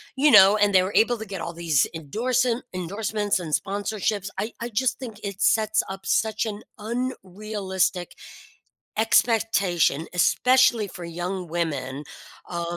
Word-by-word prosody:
you 285 +2 +4
know? 195 +2 +8
And 205 -1 +2
they 185 - +6
were 190 +2 -4
able 235 +2 +4
to 220 - -7
get 195 -4 -6
all 170 - -5
these 165 -5 +1
endorsen 235 - -1
endorsements 205 +3 -2
and 165 -4 -6
sponsorships. 200 +1 -2
I 220 +2 -3
I 235 - -3
just 240 +3 0
think 230 -6 -8
it 200 0 -6
sets 215 0 +2
up 195 0 -8
such 220 0 0
an 215 -1 -5 0.2
unrealistic 210 -5 -3 0.9
expectation, 200 - +2
especially 250 +4 +3
for 180 -1 -10
young 175 +1 -5
women, 150 -4 -3 0.5
um, 170 0 -3
200 Hz, 140 wpm, -24 LUFS, 175-220 Hz, 0.9 s, know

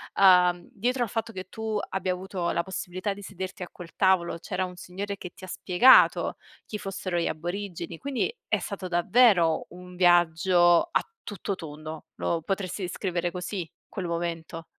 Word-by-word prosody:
uhm, 180 -2 +5
dietro 245 +4 0
al 235 - -3
fatto 225 +1 -3
che 185 -3 -6
tu 220 -1 -3
abbia 190 -1 -1
avuto 180 -1 -3
la 170 - 0
possibilità 190 +1 -3
di 200 - -11
sederti 190 -1 -7
a 180 - -5
quel 170 -2 -11
tavolo 185 -3 +3
c'era 185 +2 -2
un 180 0 -8
signore 195 +3 -5
che 180 - -7
ti - - -15
ha - - -7
spiegato 190 +7 +5 0.3
chi 210 - -5
fossero 190 -2 -3
gli 170 - 0
aborigeni, 175 0 -5
quindi 280 - -2
è - - +2
stato 195 -3 -5
davvero 175 -2 +4
un 180 0 -12
viaggio 175 - +4
a - - +3 0.3
tutto 200 0 -3
tondo, 155 -1 -8
lo 170 -1 -1
potresti 195 +2 -3
descrivere 180 -1 -2
così 180 -1 -5 0.2
quel 190 -3 -5
momento? 165 -1 -4
180 Hz, 165 wpm, -27 LUFS, 175-195 Hz, 0.3 s, uhm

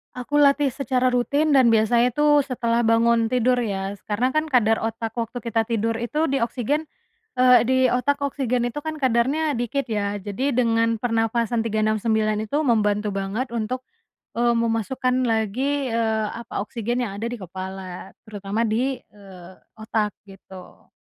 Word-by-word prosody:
Aku 250 +4 -2
latih 285 0 +4
secara 255 -1 0
rutin 280 +5 +1
dan 240 -3 +5
biasanya 235 +2 +3
tuh 295 0 +3
setelah 235 -3 0
bangun 230 0 +3
tidur 250 +2 +2
ya, 200 -4 -3
karena 220 +5 0
kan 310 +4 0
kadar 235 -7 +3
otak 225 0 -3
waktu 235 +1 -4
kita 225 0 -1
tidur 225 0 -1
itu 300 +7 -1
di 275 - +1
oksigen, 260 +5 -1 0.5
eee, 250 -1 +5
di 260 +2 +2
otak 280 +4 0
oksigen 260 -3 -1
itu 240 - -10
kan 310 0 -5
kadarnya 265 +4 +1
dikit, 245 +2 -2
ya. 205 -2 -2
Jadi 245 +8 -2
dengan 230 -2 +1
pernafasan 230 0 0
3-6-9 215 0 0
itu 285 +8 -1
membantu 210 -5 +1
banget 200 +6 -3
untuk, 235 +2 -3 0.5
eee, 235 0 +1
memasukkan 245 +3 0
lagi, 250 +5 -1
eee, 220 -1 0
apa, 230 -3 -5
oksigen 240 +2 -2
yang 200 - -5
ada 230 - -2
di 245 - -5
kepala, 185 -1 -8
terutama 205 +1 -3
di, 245 +5 0
eee, 190 -5 -15 0.2
otak, 220 -1 -2
gitu. 190 -2 -14
230 Hz, 150 wpm, -23 LUFS, 215-255 Hz, 0.5 s, dan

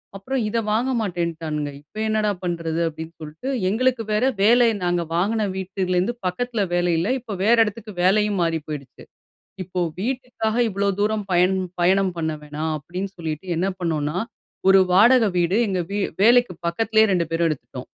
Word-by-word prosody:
அப்புறம் 250 +7 -2
இதை 230 +2 0
வாங்க 235 +5 +1
மாட்டேன்னுட்டானுங்க. 165 -6 -3
இப்போ 155 +9 -11
என்னடா 215 -1 +1
பண்ணுறது? 165 -2 -2
அப்படின்னு 160 +1 -7
சொல்லிட்டு, 155 - -6 0.2
எங்களுக்கு 245 +3 +1
வேற 210 +4 +2 0.2
வேலை 235 +3 +5 0.2
நாங்க 175 0 +1
வாங்கின 210 +4 +1
வீட்டுலேருந்து 190 +2 -1
பக்கத்தில 225 +4 -1
வேலை 175 -1 +2
இல்ல. 175 - -1
இப்போ 225 -3 -7
வேற 230 +3 +5
இடத்துக்கு 210 0 -7
வேலையும் 205 +1 +3
மாறி 165 -1 +1
போயிடுச்சு. 140 -4 -8 0.6
"இப்போ 180 0 -4 0.2
வீட்டுக்காக 240 -1 -2
இவ்ளோ 200 0 -1
தூரம் 210 0 0
பயண் 180 +2 +3 0.2
பயணம் 185 +1 +3
பண்ண 160 -1 -1
வேணாம்" 150 +2 -4
அப்படின்னு 180 +6 -5
சொல்லிட்டு, 160 0 -5
என்ன 185 +3 0
பண்ணோம்னா, 155 -2 -1 0.5
ஒரு 190 0 +7
வாடகை 225 +4 +6
வீடு, 175 +3 +2
எங்க 185 -2 -1
வீ 205 - -1 0.2
வேலைக்கு 240 -1 +5
பக்கத்திலயே 220 +5 +3
ரெண்டு 170 -2 +1
பேரும் 165 0 +1
எடுத்துட்டோம். 130 -3 -6
190 Hz, 155 wpm, -22 LUFS, 170-220 Hz, 0.6 s, ஒரு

